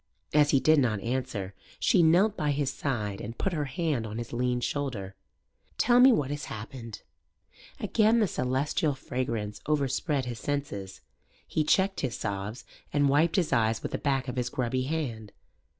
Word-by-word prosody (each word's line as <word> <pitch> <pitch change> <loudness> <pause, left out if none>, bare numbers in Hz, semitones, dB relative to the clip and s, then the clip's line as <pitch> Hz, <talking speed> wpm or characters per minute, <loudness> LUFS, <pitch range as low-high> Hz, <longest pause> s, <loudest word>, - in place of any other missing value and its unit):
As 150 -1 +5
he 140 - +4
did 155 +2 +5
not 115 -6 +1
answer, 115 -6 -3 0.3
she - - +4
knelt 180 +6 +4
by 150 -6 -1
his 140 -1 0
side 105 -9 -3
and 115 +3 -7
put 195 - -1
her 150 -3 -1
hand 135 -4 -1
on 105 +1 -6
his 120 0 -6
lean 125 0 0
shoulder. 120 -8 -3 0.6
"Tell 245 0 +4
me 260 +1 +8
what 145 - +1
has 145 -1 -4
happened." 115 0 -8 0.8
Again 225 +1 +3
the 215 - +4
celestial 140 -1 0
fragrance 115 -6 -3
overspread 145 -1 0
his 120 -2 -5
senses. 105 -10 -4 0.4
He 155 - 0
checked 190 +5 +2
his 125 -3 -2
sobs 100 +4 -4 0.3
and 145 -1 +3
wiped 155 +4 +3
his 175 -7 +1
eyes 110 -2 +2
with - - -3
the - - -2
back 135 -2 0
of 125 - -4
his 125 0 0
grubby 130 +1 -1
hand. 120 -9 -3
135 Hz, 170 wpm, -28 LUFS, 115-150 Hz, 0.8 s, me